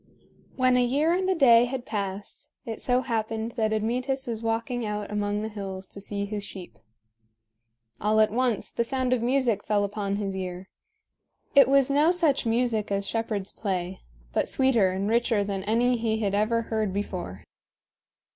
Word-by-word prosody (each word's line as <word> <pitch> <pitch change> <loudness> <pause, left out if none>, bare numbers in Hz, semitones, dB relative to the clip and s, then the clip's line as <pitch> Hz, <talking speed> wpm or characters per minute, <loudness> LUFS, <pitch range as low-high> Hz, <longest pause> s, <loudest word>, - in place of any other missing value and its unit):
When 255 -1 +3
a 250 - +4
year 290 +7 +2
and 375 +1 0
a 380 - +2
day 240 -6 +6
had 245 0 -5
passed, 200 -2 -4 0.2
it 225 -2 -5
so 250 0 +2
happened 225 -2 -2
that 220 -2 0
Admetus 250 +5 -1
was 230 -2 -4
walking 230 +2 -2
out 210 -1 -4
among 205 0 -1
the - - -2
hills 195 -3 -6
to 200 - -9
see 200 0 -3
his 205 0 -4
sheep. 180 - -9 1.2
All 215 +1 +2
at 215 -1 +4
once 245 -2 0
the 235 - 0
sound 255 +1 0
of 250 - 0
music 240 -4 +1
fell 205 -1 +1
upon 200 0 -2
his 200 -2 -3
ear. 185 0 -5 0.8
It 280 - +7
was 275 0 +4
no 295 +3 +4
such 325 -8 +2
music 225 -3 0
as 200 0 0
shepherds 215 -3 -2
play, 185 -3 -3 0.3
but - - +1
sweeter 245 -8 +3
and 190 +2 -2
richer 230 -2 +2
than 195 -1 -3
any 240 +3 +2
he 225 -1 0
had 205 -3 -1
ever 225 +3 +1
heard 220 -3 -1
before. 185 - -4
220 Hz, 175 wpm, -26 LUFS, 205-245 Hz, 1.2 s, It